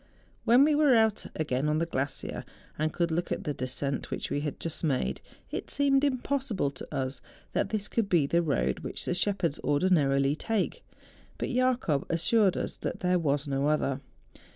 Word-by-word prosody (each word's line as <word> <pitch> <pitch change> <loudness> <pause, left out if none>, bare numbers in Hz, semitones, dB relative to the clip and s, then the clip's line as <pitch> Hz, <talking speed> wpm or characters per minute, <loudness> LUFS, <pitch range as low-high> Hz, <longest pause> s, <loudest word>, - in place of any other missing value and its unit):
When 245 +4 +7
we 305 +1 +4
were 290 -4 +5
out 220 -2 +2
again 150 -2 0
on 155 - +2
the 165 - +1
glacier, 135 -4 -3 0.3
and 155 +1 0
could 170 0 0
look 175 +2 -1
at - - -2
the 150 - -2
descent 130 +1 -3
which - - -4
we - - +1
had 150 -1 -4
just 165 0 -5
made, 130 - 0 0.3
it - - -4
seemed 275 -1 +3
impos¬ 275 -1 0
sible 145 -9 0
to 130 - -8
us 130 -1 -3 0.3
that - - 0
this 210 -2 -2
could 225 -4 -1
be 165 -5 +4
the 170 +5 +2
road 155 -5 0
which - - -6
the - - 0
shepherds 180 -4 0
ordinarily 145 -3 +3
take. 225 - -2 0.5
But - - -2
Jacob 250 - +1
assured 190 +4 +3
us - - -3
that - - -4
there 180 0 +2
was 145 -2 0
no 140 +1 0
other. 140 -3 +1
165 Hz, 185 wpm, -29 LUFS, 140-220 Hz, 0.5 s, When